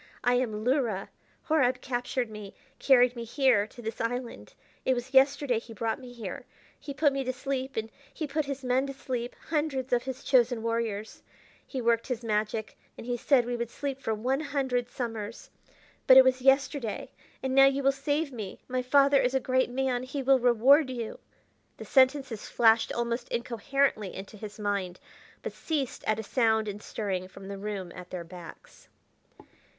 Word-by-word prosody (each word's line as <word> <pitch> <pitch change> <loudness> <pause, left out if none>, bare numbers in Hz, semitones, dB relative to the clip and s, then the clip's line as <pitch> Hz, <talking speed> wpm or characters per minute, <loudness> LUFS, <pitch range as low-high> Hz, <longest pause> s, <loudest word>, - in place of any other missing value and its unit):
I 245 - +3
am 225 -4 0
Luhra. 245 -7 0 0.3
Horab 260 -5 +2
captured 245 -1 -2
me; 210 -2 -9 0.2
carried 250 -2 +5
me 235 - -5
here 235 -3 +2
to 240 +2 -13
this 225 0 -4
island; 245 +1 -4 0.3
it 260 - +2
was 245 +2 -5
yesterday 270 -2 +4
he 230 0 -12
brought 225 +4 -2
me 250 -2 -11
here. 240 +2 -7 0.3
He 285 - -7
put 285 +1 +2
me 275 0 -1
to 255 - -1
sleep, 265 0 -4
and 220 0 -3 0.2
he 315 - -4
put 300 +1 -1
his 275 -1 -5
men 255 +2 +1
to 275 - -5
sleep, 250 -3 -4
hundreds 295 -5 -1
of 240 - +3
his 265 +1 -6
chosen 245 -3 +3
warriors. 230 -2 -2 0.5
He 265 - -4
worked 230 -1 +1
his 245 -3 -3
magic, 215 0 -2 0.2
and - - -9
he 245 0 -1
said 245 0 +3
we 245 0 -2
would 235 -1 -3
sleep 275 +1 -5
for 220 - -1
one 255 +6 0
hundred 265 -5 -1
summers. 230 -3 -5 0.6
But 260 - +9
it 265 - +11
was 260 0 +2
yesterday. 270 -3 +1 0.3
And 265 -1 -1
now 270 0 +8
you 275 0 0
will 275 - +5
save 285 +2 -1
me; 210 -5 -7
my 255 0 -1
father 275 +2 +4
is 250 +2 0
a - - +4
great 260 0 +1
man; 255 -1 -1
he 265 +2 -4
will 265 0 +5
reward 250 +4 +5
you 235 -3 -5 0.3
" - - -41
The - - -8
sentences 260 -4 +2
flashed 225 -1 +4
almost 235 +1 -2
incoherently 235 -2 -1
into 195 +2 -8
his 210 0 -9
mind, 200 -4 -2 0.4
but - - -4
ceased 290 -6 -3
at 215 - +2
a 220 - -4
sound 220 -2 +2
and 205 0 -5
stirring 190 -5 -3
from 195 +1 -12
the 200 -1 -6
room 195 -3 -5
at 180 0 -10
their 180 -2 -5
backs. 175 0 -13
245 Hz, 185 wpm, -28 LUFS, 220-270 Hz, 0.6 s, it